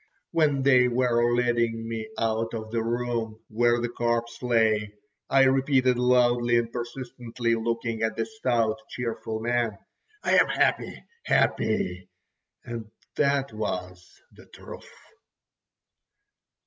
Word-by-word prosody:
When 145 -4 +2
they 130 -2 +5
were 120 -1 +2
leading 120 -2 0
me 110 -1 -5
out 115 +1 -1
of 110 -1 -6
the 115 -1 0
room 115 -1 -2
where 120 +2 +2
the 120 - -1
corpse 120 0 -2
lay, 110 -4 +1 0.3
I 135 0 +5
repeated 130 -1 +3
loudly 120 -1 +3
and 115 -1 -1
persistently, 120 -1 -4
looking 115 0 -2
at 110 -1 0
the 115 - 0
stout, 120 - 0
cheerful 115 -2 -4
man: 120 -3 0 0.5
"I - - +4
am - - +4
happy, - - 0 0.2
happy!" 95 -4 0 0.6
And 115 -2 -6 0.3
that 140 -3 +1
was 90 -4 -6
the - - -17
truth. - - -12
120 Hz, 120 wpm, -26 LUFS, 110-125 Hz, 0.6 s, they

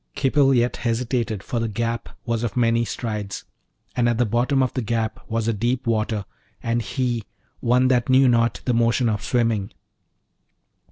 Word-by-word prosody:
Khipil 135 -1 +3
yet 120 0 +1
hesitated, 115 -3 -1
for 120 - -2
the 115 - -1
gap 115 +2 -3 0.2
was 115 -1 -1
of 115 -3 -3
many 115 -1 +3
strides, 105 -2 -4 0.5
and 120 -1 +2
at 120 - 0
the 120 - +3
bottom 125 +5 +2
of 130 - -1
the 130 - -1
gap 115 0 -2
was 115 0 -1
a 115 - +2
deep 120 +4 -1
water, 110 -2 0 0.4
and 115 0 0
he 120 -2 -2 0.4
one 125 +2 +3
that 125 0 +2
knew 130 +1 +6
not 115 -1 +2
the 125 - +1
motion 120 +1 +2
of 105 -2 -1
swimming. 115 -4 0
115 Hz, 170 wpm, -23 LUFS, 115-125 Hz, 0.5 s, knew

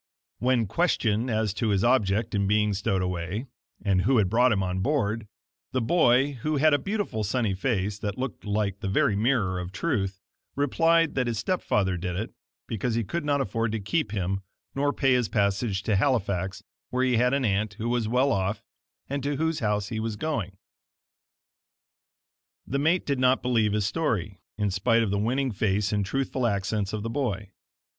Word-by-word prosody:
When 125 -2 +2
questioned 115 - +1
as 110 -3 0
to 110 +1 -1
his 100 -1 +2
object 110 -3 +2
in 100 -1 +1
being 105 0 +2
stowed 95 -1 0
away, 90 +6 -3 0.4
and 95 -2 +3
who 130 +6 +3
had 100 -4 +3
brought 125 +2 +4
him 95 -3 +1
on 90 0 -2
board, 115 -3 0 0.5
the 130 - +2
boy, 130 0 +3
who 155 +3 0
had 155 +2 +4
a 145 - +4
beautiful 200 - -2
sunny 105 0 0
face, 100 -1 -1
that 100 -1 -3
looked 130 -2 -4
like 100 -2 -1
the 100 - -4
very 100 +1 +2
mirror 105 -5 +1
of 90 0 -5
truth, 95 - -1 0.4
replied 165 +3 +3
that 125 -2 0
his 115 -2 -1
step 185 - -1
father 95 -3 +1
did 90 0 -3
it, 110 +5 -4 0.3
because 115 +1 -2
he 115 - +1
could 170 - -3
not 145 -1 +1
afford 115 -4 -1
to 110 - -1
keep 105 +4 -1
him 95 -1 -1 0.3
nor 145 +1 +1
pay 135 -2 +2
his 125 -4 +1
passage 100 -1 0
to 105 - +1
Halifax 100 -6 0 0.3
where 130 +1 +1
he 125 -2 +2
had 125 +3 +3
an 140 -2 0
aunt 105 0 0
who 110 +2 -4
was 120 -2 0
well 125 +4 +2
off, 100 0 -1 0.4
and 140 +1 -3
to 145 +2 -1
whose 160 +2 0
house 105 -2 0
he 110 - -3
was 110 -1 -2
going. 110 - -3 2.1
The 140 - -2
mate 160 +5 +2
did 140 -2 -1
not 130 +1 +3
believe 115 -4 +2
his 105 -2 +1
story, 105 - -1 0.2
in 105 -2 0
spite 115 +5 +2
of 105 - -1
the 100 - 0
winning 130 +5 0
face 105 0 0
and 105 -1 +1
truthful 130 +3 -1
accents 100 -1 -1
of 110 -1 -3
the 115 - -3
boy. 110 -7 -2
110 Hz, 190 wpm, -26 LUFS, 100-130 Hz, 2.1 s, brought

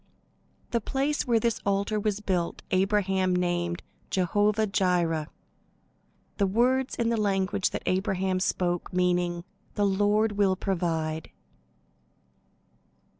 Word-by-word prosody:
The 235 - +1
place 275 +6 -1
where 235 -2 +3
this 230 0 0
altar 200 +2 0
was 210 0 -1
built 180 -4 -2
Abraham 190 -1 +2
named 175 -1 -1 0.3
Jehovah 205 +4 +2
jireh, 175 -6 +1 1.1
words 245 +7 +2
in 235 -1 0
the 230 - +1
language 200 0 +1
that - - -5
Abraham 190 0 0
spoke 175 -1 -1
meaning, 180 -1 +1 0.3
"The 205 - +2
Lord 205 +2 +2
will 200 -2 +2
provide." 165 -4 -2
195 Hz, 105 wpm, -27 LUFS, 180-210 Hz, 1.1 s, where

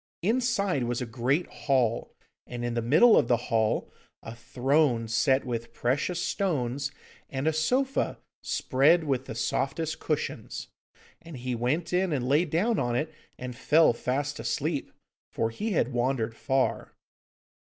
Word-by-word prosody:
Inside 200 - +1
was 120 0 -1
a 125 - -2
great 125 +8 0
hall, 125 -5 0 0.4
and 120 -1 -5
in 120 - -2
the 120 - 0
middle 155 - +6
of - - +4
the 120 - +3
hall 115 -2 0 0.3
a 115 - -7
throne 125 +1 +1
set 130 +5 +2
with 115 -2 -4
precious 145 +8 0
stones 140 -9 -1 0.4
and 135 +1 -3
a 160 - +3
sofa 255 - 0 0.2
spread 150 +6 +3
with 135 -3 -1
the 110 - -7
softest 150 +7 -1
cushions. - - -3 0.5
And 165 -4 -10
he 125 +1 -3
went 140 +9 -1
in 185 0 +2
and 130 -4 -1
lay 150 +6 +3
down 190 +8 +1
on 120 -1 0
it, 155 +5 -2 0.2
and 125 -1 -6
fell 155 +3 +4
fast 140 +5 -2
asleep, 150 -1 -2 0.4
for 115 0 -1
he 210 - -3
had 135 -6 +1
wandered 120 -2 0
far. 135 +2 -1
135 Hz, 150 wpm, -28 LUFS, 120-160 Hz, 0.5 s, middle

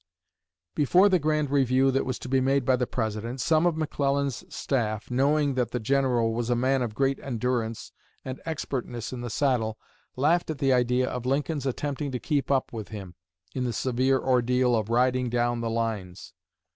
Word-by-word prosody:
Before 180 +8 +4
the 185 -2 +3
grand 150 -2 0
review 135 -1 +3
that 135 0 0
was 130 -3 -2
to - - -8
be 130 +1 +2
made 135 0 +1
by 130 - +4
the 125 -1 -1
President, 115 +2 -3
some 160 +5 +3
of 165 -2 0
McClellan's 140 -4 -1
staff, 110 -5 -2
knowing 140 +3 +2
that 125 -3 0
the 125 - -2
General 120 -2 +1
was 120 +1 -2
a 120 - +3
man 130 +2 +1
of 115 -3 -3
great 135 +1 +1
endurance 120 -3 -2 0.3
and 130 0 -6
expertness 130 -7 -4
in 125 - -5
the 120 - -4
saddle, 115 -3 0 0.4
laughed 160 +7 +2
at 155 - -3
the 135 -1 +2
idea 125 +1 +2
of 125 0 -4
Lincoln's 140 +1 -1
attempting 145 +2 -2
to 125 - -2
keep 145 0 -1
up 135 -3 +1
with 110 -3 -5
him 100 -5 -8 0.4
in 130 - -2
the 120 -2 -1
severe 130 +3 +1
ordeal 125 -1 +2
of 110 -1 -1
"riding 125 +1 +2
down 120 0 0
the 115 - -2
lines." 110 -5 -3
130 Hz, 185 wpm, -26 LUFS, 120-140 Hz, 0.4 s, Before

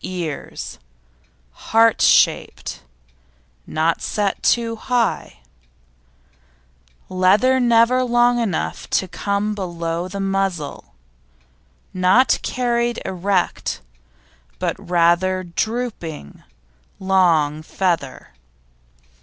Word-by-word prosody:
EARS 175 -5 -6 0.9
Heart 225 0 +4
shaped; - - +2 0.9
not 160 +1 0
set 205 -2 -2
too 230 -1 +1
high; 230 - -2 1.7
leather 200 +8 +3
never 240 +1 +4
long 240 0 +3
enough 210 -8 -3
to 190 - 0
come 200 +3 -2
below 170 -3 -4
the 200 +2 -6
muzzle; 195 - -3 1.0
not 185 +8 +3
carried 240 -1 -1
erect, 190 0 -1 0.8
but - - -2
rather 175 +2 +2
drooping, 175 - -4 0.6
long 170 -6 +2
feather. 160 -5 -2
190 Hz, 75 wpm, -20 LUFS, 170-230 Hz, 1.7 s, Heart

